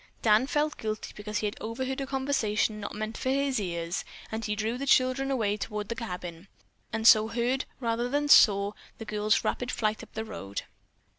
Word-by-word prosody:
Dan 220 +3 +4
felt 300 +1 0
guilty 215 -1 -4
because 210 0 -4
he 210 - -1
had 205 - -3
overheard 260 +4 -3
a 270 - -3
conversation 235 -6 0
not 205 - -6
meant 215 +1 -4
for 260 - -1
his 275 -2 +1
ears, 170 -2 -3 0.3
and 220 +1 -3
he 210 0 -1
drew 220 +3 -1
the 275 +2 -4
children 260 +1 +3
away 215 -6 0
toward 210 -1 -4
the 230 - -2
cabin, 180 -5 -6 0.4
and 225 0 -2
so 215 -2 +8
heard, 245 +3 0
rather 235 0 -1
than 290 +2 0
saw, 200 -7 +6 0.3
the 225 - -7
girl's 210 0 +1
rapid 245 - -1
flight 215 -1 -1
up - - -12
the 220 0 -4
road. 100 - -6
220 Hz, 195 wpm, -28 LUFS, 210-255 Hz, 0.4 s, so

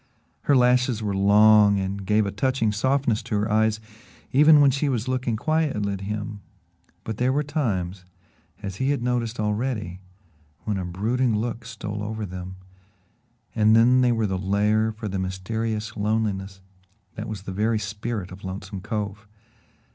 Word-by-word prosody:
Her 145 - +4
lashes 125 -2 +3
were 100 -2 -1
long 105 +1 +5
and 95 +1 -3
gave 105 0 +3
a 100 - -2
touching 115 +1 0
softness 125 +1 +1
to - - -4
her 105 +1 0
eyes 110 0 +2 0.5
even 150 +3 +7
when 140 -1 +6
she 140 +2 0
was 120 -2 -1
looking 125 -3 -1
quietly 135 -7 0
at 95 - -6
him, 105 +1 -5 0.6
but 110 -2 -5
there 125 +2 +2
were 145 +3 +1
times, 100 - -2 0.6
as 95 -2 -5
he 130 +4 0
had 140 -4 0
noticed 120 -2 -1
already, 105 -4 -2 0.6
when 105 -2 -2
a 90 - -3
brooding 110 +7 0
look 115 +1 -3
stole 105 -2 -6
over 110 +1 -4
them, 90 0 -7 1.0
and 110 0 +4
then 125 +3 +5
they 125 -1 +3
were 115 -2 +1
the 95 -2 -2
lair 105 +3 +1
for 110 0 -7
the 95 -1 -3
mysterious 110 +4 -3
loneliness 100 -3 -2 0.5
that 110 +1 -6
was 105 -3 -6
the 100 - -6
very 110 +4 +1
spirit 105 -2 -4
of 95 +1 -11
Lonesome 95 0 -6
Cove. 105 0 -4
110 Hz, 160 wpm, -24 LUFS, 100-120 Hz, 1.0 s, even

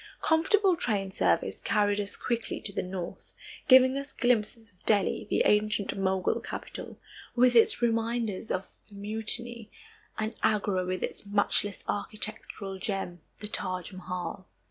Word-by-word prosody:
Comfortable 365 +4 +4
train 200 - -1
service - - +1
carried 205 -1 +2
us 205 -1 -4
quickly 235 -2 -2
to 200 - -4
the - - -1
north, 180 -1 -7 0.3
giving 260 0 +7
us 280 0 -7
glimpses 230 -1 0
of 180 - -28
Delhi, 205 -3 +2
the - - +3
ancient 210 -1 +2
Mogul 190 -1 +1
capital, - - -7 0.4
with 245 0 +5
its 235 +1 +5
reminders 230 -2 0
of 185 +1 -3
the 205 - -14
mutiny; 220 +2 -1 0.5
and 215 +1 -2
Agra 200 -3 +1
with 185 0 -2
its - - -4
matchless 205 0 +1
architectural 205 -2 -4
gem, 195 -4 -3 0.2
the 210 - -3
Taj 185 -2 -3
Mahal. 185 +1 -5
210 Hz, 140 wpm, -29 LUFS, 195-235 Hz, 0.5 s, giving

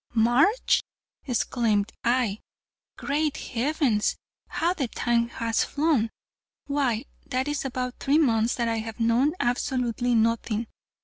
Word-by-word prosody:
"March!" 245 - +3 0.5
exclaimed 230 -3 +1
I. 240 -4 +1 0.6
"Great 295 +1 -1
heavens, 255 -3 0 0.3
how 340 +2 0
the 280 -8 -2
time 235 0 0
has 230 -1 0
flown! 285 -7 +1 0.6
Why, 270 -4 0 0.2
that 260 -1 -1
is 295 -1 -2
about 250 -1 -3
three 285 +2 +2
months 230 -6 +2
that 235 -1 -1
I 225 0 0
have 220 0 -7
known 235 +6 +3
absolutely 245 -1 0
nothing. 230 0 +1
245 Hz, 120 wpm, -26 LUFS, 230-280 Hz, 0.6 s, March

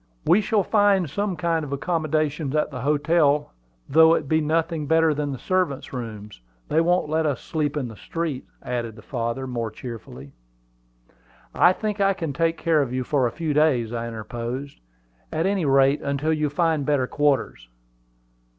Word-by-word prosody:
"We 185 +5 +5
shall 210 -1 +1
find 205 -4 +3
some 200 +6 -2
kind 165 -2 0
of 145 - -7
accommodations 155 -1 -1
at 150 0 +1
the 125 -3 -6
hotels, 150 +1 +2 0.4
though 160 +2 +6
it - - -3
be 160 +2 +2
nothing 160 0 -1
better 160 0 +4
than 145 -1 -2
the 135 - -4
servants' 180 -5 -1
rooms. 105 - -7 0.3
They 160 - +3
won't 175 0 +2
let 160 +1 +1
us 140 -5 -1
sleep 150 -2 -2
in 135 -4 -2
the 110 - -9
streets," 160 0 -4
added 120 -3 -3
the 110 - -14
father, 115 +2 -3
more 120 -3 -3
cheerfully. 110 - -9 1.2
"I 175 - +5
think 210 +1 -3
I 195 0 +4
can 165 -6 -4
take 165 +3 0
care 165 -3 +2
of 135 -4 -2
you 130 0 -1
for 130 -1 +1
a - - -4
few 160 0 -2
days," 135 -7 +2
I 115 0 -3
interposed; 120 +4 -6 0.5
"at 160 - -1
any 195 -3 +1
rate, 135 +1 +4
until 140 +3 0
you 155 -1 0
find 160 0 +1
better 140 -2 +1
quarters." 135 - 0
150 Hz, 175 wpm, -24 LUFS, 130-165 Hz, 1.2 s, though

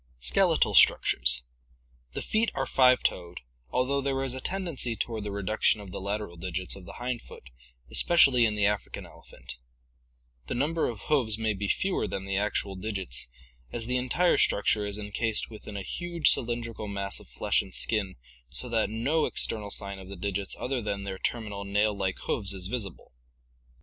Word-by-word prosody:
Skeletal - - +3
Structures.— - - +5 0.7
The - - -4
feet 220 +1 +1
are - - 0
five 130 -1 +4
toed, 90 0 -2 0.3
although 135 +2 +1
there 135 -1 -1
is 130 -2 +1
a 130 - -4
tendency 170 -11 -2
toward 110 -2 -3
the 105 - -4
reduction 100 +2 +1
of 100 -3 -9
the - - -5
lateral 100 -2 -3
digits 90 +1 -2
of 95 -2 -11
the 85 - -9
hind 120 -1 -3
foot, 60 - -13 0.4
especially 130 - +5
in 110 -2 +2
the 105 -1 +2
African 105 0 -1
elephant. 65 - -11 0.9
The - - -2
number 155 +6 +1
of 110 -4 -7
hoofs 120 -7 +2
may 110 -1 0
be 100 0 -3
fewer 190 - 0
than 95 - -4
the 100 0 -2
actual 100 -1 -1
digits, 95 - -3 0.4
as 115 - -2
the 125 +2 0
entire 130 +8 +2
structure 105 +1 +2
is 100 0 -3
en 105 -1 -7
cased 115 +1 0
within 105 -1 -8
a 100 - -4
huge 175 - +2
cylindrical 115 -2 -1
mass 100 -1 -3
of - - -14
flesh - - +1
and - - -11
skin 105 -4 -1 0.3
so 70 - -5
that 115 -2 +1
no 135 +9 +1
external 105 -2 -2
sign 100 -1 -3
of 95 0 -11
the 100 - -6
digits 100 +1 -1
other 130 -1 -1
than 100 -2 -3
their 95 -1 -5
terminal 105 -4 -3
nail 105 +1 +1
like 95 -1 -1
hoofs 100 -3 +1
is 95 -2 -4
visible. 100 -3 -4
105 Hz, 180 wpm, -28 LUFS, 100-125 Hz, 0.9 s, Structures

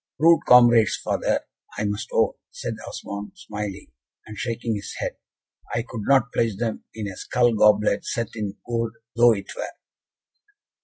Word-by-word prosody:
"Rude 165 +1 +6
comrades, 120 -4 +7
father, - - 0 0.4
I - - -1
must 105 0 -3
own," - - +2 0.2
said - - -5
Osmond, 100 - -6
smiling, 105 - -6 0.3
and 110 - -9
shaking 115 +2 -2
his 100 -2 -5
head. - - -3 0.6
"I 115 - 0
could 115 - -6
not 130 -3 +3
pledge 115 -4 +1
them 115 -1 -3
in 110 -2 -4
a 95 - -6
skull 120 +3 +2
goblet 105 -1 +4
set 115 -2 -2
in 105 -2 -4
gold 115 -1 -2 0.2
though 120 0 +6
it 100 -2 -6
were." - - -4
110 Hz, 155 wpm, -24 LUFS, 105-120 Hz, 0.6 s, comrades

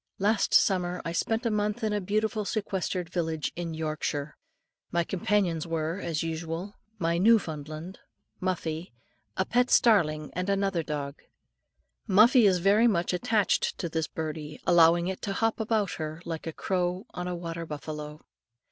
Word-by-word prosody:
Last 205 +2 +1
summer 180 -2 +3
I 165 - -2
spent 225 +7 -1
a 230 - +2
month 210 +2 -1
in 215 -1 +1
a 205 - 0
beautiful 215 +3 0
sequestered 190 -4 -2
village 160 -4 -2
in 170 -2 -4
Yorkshire. 155 -2 -3 0.6
My 170 0 +2
companions 175 -3 0
were, 165 +2 -2
as 165 -5 -2
usual, 165 +4 -4 0.2
my 170 -2 0
Newfoundland, 165 -5 +1 0.4
Muffie, 170 -4 -3 0.4
a 190 - +1
pet 245 +3 +2
starling, 155 -10 +3
and 180 +2 -2
another 195 -3 +1
dog. 145 -2 -5 0.9
Muffie 220 +3 +6
is 185 -2 +4
very 200 +6 +4
much 175 -5 +1
attached 205 +3 +1
to 170 - -3
this 160 -2 -1
birdie, 155 -1 -5
allowing 170 +1 +5
it 190 0 -4
to 200 - -2
hop 225 +2 0
about 220 -3 0
her, 155 0 -5
like 165 -1 -5
a - - -2
crow 180 +3 -1
on 180 0 -5
a 180 - -2
water 165 -1 -5
buffalo. 150 0 -6
175 Hz, 155 wpm, -28 LUFS, 160-205 Hz, 0.9 s, Muffie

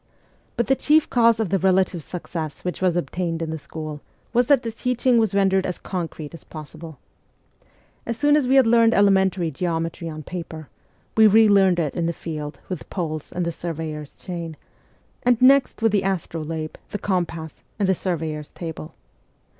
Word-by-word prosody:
But 235 - +2
the 270 - +3
chief 305 +3 +3
cause 230 -2 +4
of 220 -5 0
the 195 - +1
relative 185 -2 +2
success 160 -2 -6
which 180 - -3
was 180 -2 +2
obtained 170 -1 -2
in 160 - -4
the 160 - -4
school 155 0 -7 0.3
was 245 0 +3
that 280 -3 +4
the 230 - -3
teaching 250 +1 +1
was 220 -3 +1
rendered 190 -1 +3
as 180 - -3
concrete 165 -4 -5
as 165 - -11
possible. 155 0 -10 1.1
As 235 -1 -2
soon 290 +2 +4
as 295 -4 +2
we 265 - +3
had 265 -2 +7
learned 230 0 +5
elementary 190 -4 +3
geometry 165 +1 -3
on 155 -1 -7
paper, 160 -3 -7 0.5
we 220 0 +7
re 220 +1 +6
learned 195 -3 +5
it 155 -5 -1
in 170 -2 -1
the 170 - -1
field 155 -3 -6
with 185 -4 -6
poles 155 -5 -4
and 180 -1 -2
the 170 - -1
surveyor's 155 -3 -6
chain, 170 -4 -6 0.6
and 245 -2 +3
next 265 -2 +4
with 225 - +4
the 200 -1 +2
astrolabe, 165 -4 -3
the - - -3
compass, 170 -5 -3 0.2
and 200 -2 +1
the 190 - +4
surveyor's 160 -5 -3
table. 160 -2 -7
180 Hz, 180 wpm, -23 LUFS, 160-215 Hz, 1.1 s, had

